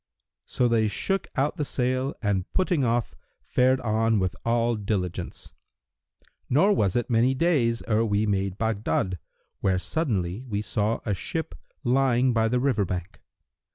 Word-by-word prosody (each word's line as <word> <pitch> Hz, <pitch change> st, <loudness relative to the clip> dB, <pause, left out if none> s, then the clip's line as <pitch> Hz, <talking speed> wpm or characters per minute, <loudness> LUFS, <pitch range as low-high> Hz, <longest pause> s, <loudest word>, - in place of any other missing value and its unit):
So 125 Hz, -, +1 dB
they 115 Hz, -2 st, +2 dB
shook 195 Hz, -, -1 dB
out 145 Hz, +6 st, 0 dB
the 150 Hz, -, 0 dB
sail 130 Hz, 0 st, -1 dB
and 100 Hz, -3 st, -1 dB
putting 180 Hz, -6 st, +1 dB
off, 120 Hz, -1 st, 0 dB, 0.3 s
fared 130 Hz, +1 st, +2 dB
on 110 Hz, -1 st, +1 dB
with 90 Hz, -5 st, 0 dB
all 115 Hz, 0 st, +1 dB
diligence; 100 Hz, -4 st, -3 dB, 1.0 s
nor 190 Hz, +11 st, +4 dB
was 100 Hz, -, +1 dB
it 120 Hz, -, 0 dB
many 125 Hz, +2 st, +2 dB
days 130 Hz, -7 st, +1 dB
ere 110 Hz, 0 st, +2 dB
we 105 Hz, -1 st, +1 dB
made 100 Hz, -2 st, -1 dB
Baghdad, 105 Hz, -4 st, -1 dB, 0.4 s
where 95 Hz, -1 st, +1 dB
suddenly 95 Hz, -, -2 dB
we 105 Hz, -5 st, -3 dB
saw 110 Hz, +1 st, -1 dB
a 105 Hz, -, 0 dB
ship 160 Hz, -, -4 dB, 0.3 s
lying 130 Hz, -1 st, +3 dB
by 115 Hz, -1 st, +2 dB
the 125 Hz, +2 st, +1 dB
river 125 Hz, -5 st, +1 dB
bank. 90 Hz, -1 st, -5 dB
115 Hz, 150 wpm, -26 LUFS, 105-130 Hz, 1.0 s, nor